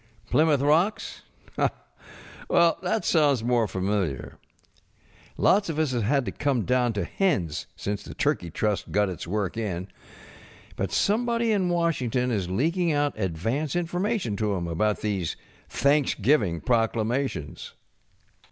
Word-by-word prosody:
Plymouth 150 -3 +3
Rocks? 165 +9 +1 1.3
Well, 170 -1 +4
that 190 +4 -1
sounds 145 -7 +3
more 120 -2 +2
familiar. 95 -7 -2 1.0
Lots 200 -1 +3
of 160 - -3
us 155 -3 +1
have 120 -2 0
had 135 +5 +1
to - - -3
come 140 -6 0
down 125 -2 +1
to 100 -3 -1
hens 95 - -1
since 100 0 -3
the - - -10
Turkey 85 - 0
Trust 100 +3 -2
got 105 -1 +2
its 90 -2 -6
work 100 +1 -2
in. 95 -4 -3 0.9
But - - -2
somebody 235 +2 +1
in 190 -4 +1
Washington 130 -8 0
is 95 -6 -1
leaking 165 - +1
out 145 -1 +1
advance 110 - -2
information 175 - -1
to 110 - -1
ŌĆÖem 90 -5 -1
about 105 +6 0
these 100 -6 -2 0.3
Thanksgiving 130 - +2
proclamations. 115 - -1
125 Hz, 130 wpm, -26 LUFS, 100-160 Hz, 1.3 s, Well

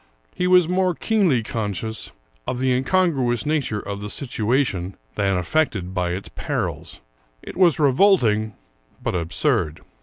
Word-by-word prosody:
He 180 - -1
was 180 -2 +5
more 180 0 +1
keenly 185 - +2
conscious 110 0 -3 0.4
of 125 - -2
the 130 +1 +1
incongruous 130 -2 +1
nature 145 -8 0
of 100 -1 -6
the 105 - -5
situation 110 -6 -1 0.2
than 95 -2 +1
affected 95 - -1
by 90 -2 -1
its 95 +3 -6
perils; - - -4 0.4
it - - -9
was 175 -5 +4
revolting, 125 - +3 0.5
but - - -1
absurd. 85 -2 0
120 Hz, 130 wpm, -22 LUFS, 100-155 Hz, 0.5 s, was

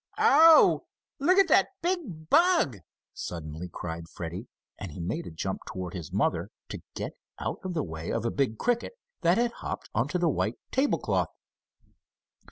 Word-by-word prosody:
"Oh! 320 +3 +7 0.3
Look 360 +7 +4
at 390 - +6
that - - +5 0.2
big 280 - -2
bug!" 330 - +4 0.3
suddenly 80 +1 -6
cried 85 0 -6
Freddie, 90 +7 -6 0.3
and 100 -5 -6
he 75 - -9
made 95 - -3
a - - -5
jump 95 +4 -3
toward 90 -2 -5
his 85 -6 -6
mother, - - 0 0.2
to - - -6
get - - -3 0.3
out - - -3
of 185 -2 -4
the 155 - 0
way 80 -1 -6
of 115 0 -1
a 115 - +1
big 130 -6 0
cricket 245 - 0 0.3
that 170 +2 +4
had 240 0 +2
hopped - - -6
onto 130 +11 0
the 175 -1 +2
white 120 -6 0
table 270 +2 +2
cloth. - - 0
130 Hz, 170 wpm, -28 LUFS, -, 0.3 s, Oh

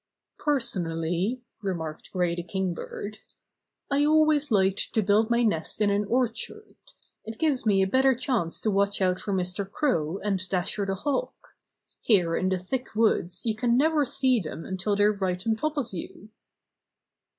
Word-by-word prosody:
"Personally," 185 - -1 0.2
remarked 165 -6 -4
Gray 180 -2 0
the 175 - -3
Kingbird, 190 +3 -4 0.7
"I 280 +1 +3
always 305 -1 +3
like 195 -3 +3 0.2
to 220 - +2
build 210 +3 +3
my 235 0 +3
nest 205 -6 -1
in 210 -1 +3
an 205 +1 +1
orchard. 240 +1 -2 0.5
It 220 0 -7
gives 280 -6 +1
me 195 -2 +4
a - - +1
better 265 +5 +3
chance 230 -9 -1
to 215 - +1
watch 200 0 +1
out 185 -1 +1
for 205 - -4
Mr. 190 +1 -1
Crow 175 - 0
and 190 -3 -2
Dasher 195 +2 -1
the 195 - -1
Hawk. 290 - -4 0.4
Here 175 -7 +3
in 185 - 0
the 190 - +1
thick 245 +7 -4
woods 210 -5 +1
you 225 - +1
can 240 +1 +2
never 305 +1 +3
see 260 -2 +2
them 165 -3 -6
until 190 +2 -1
they're 205 +1 +4
right 185 -2 -2
on 225 -1 +2
top 305 +6 -2
of 245 -7 -2
you." 185 +4 -8
205 Hz, 165 wpm, -26 LUFS, 185-245 Hz, 0.7 s, me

